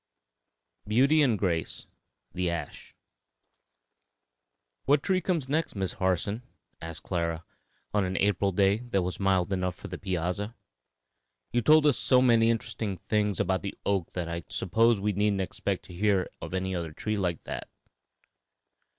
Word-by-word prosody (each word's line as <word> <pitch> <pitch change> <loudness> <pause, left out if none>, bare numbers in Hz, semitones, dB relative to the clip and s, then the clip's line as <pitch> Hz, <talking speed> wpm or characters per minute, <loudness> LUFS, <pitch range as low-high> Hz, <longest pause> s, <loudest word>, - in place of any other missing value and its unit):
BEAUTY 135 +8 +4
AND 125 -7 +3
GRACE: 85 -6 -2 0.5
THE 90 -1 0
ASH. 85 -1 -6 1.9
"What 145 +1 +3
tree 185 -1 +1
comes 165 -6 -1
next, 155 0 -1
Miss 95 -2 -2
Harson?" 95 +4 0 0.4
asked 80 0 -7
Clara, 85 -2 -2 0.5
on 105 -1 +2
an 95 0 -2
April 100 0 +2
day 100 +2 +3
that 115 -6 -1
was 90 0 -3
mild 95 -1 +2
enough 90 -1 -1
for - - -9
the - - -6
piazza. 95 +4 -2 1.0
"You 120 - +2
told 155 +5 +6
us 140 -6 +4
so 130 - +4
many 115 -3 +5
interesting 110 -4 -2
things 105 +1 0
about 95 -1 +1
the 100 - -5
oak 95 -4 0
that 90 -2 -3
I 85 0 -4
suppose 115 +4 +2
we 105 +1 0
needn't 100 0 +1
expect 95 - -3
to - - -12
hear 100 0 +2
of 85 - -5
another 90 -4 -2
tree 105 +6 -2
like 90 -5 -1
that." - - -6
100 Hz, 150 wpm, -28 LUFS, 90-115 Hz, 1.9 s, told